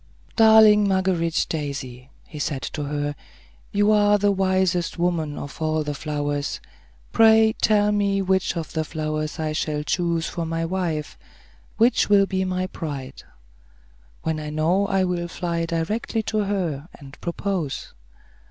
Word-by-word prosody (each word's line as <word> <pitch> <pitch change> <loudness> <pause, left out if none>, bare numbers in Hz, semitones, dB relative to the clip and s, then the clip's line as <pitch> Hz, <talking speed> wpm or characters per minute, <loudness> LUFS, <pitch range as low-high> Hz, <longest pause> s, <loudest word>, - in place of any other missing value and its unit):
"Darling 220 -2 +7
Marguerite 185 -4 +1
daisy," 135 -4 -5 0.2
he 150 - -10
said 140 -2 -2
to 150 - -4
her, 145 0 -2 0.6
"you 205 +1 +3
are 205 -1 +4
the 205 0 +2
wisest 185 -2 0
woman 170 -4 -1
of 145 +2 -8
all 155 0 0
the 150 0 -3
flowers. 145 -1 -3 0.5
Pray 220 0 +5
tell 210 -1 +3
me 200 -1 +1
which 190 -2 0
of 165 -2 -5
the 160 - 0
flowers 155 0 -3
I 155 -1 -2
shall 150 -1 -2
choose 170 0 0
for 170 - -4
my 165 0 -2
wife. 165 -4 -3 0.6
Which 230 0 +3
will 200 -1 +5
be 190 -1 -1
my 185 0 -1
bride? 140 -7 -6 1.0
When 160 -1 -1
I 150 -1 -5
know, 165 +6 +1
I 195 -1 +1
will 175 -1 -1
fly 170 -1 -3
directly 210 +7 -2
to 215 0 -1
her, 170 -7 -2
and 140 0 -13
propose." 170 -4 -3
170 Hz, 145 wpm, -23 LUFS, 155-195 Hz, 1.0 s, Darling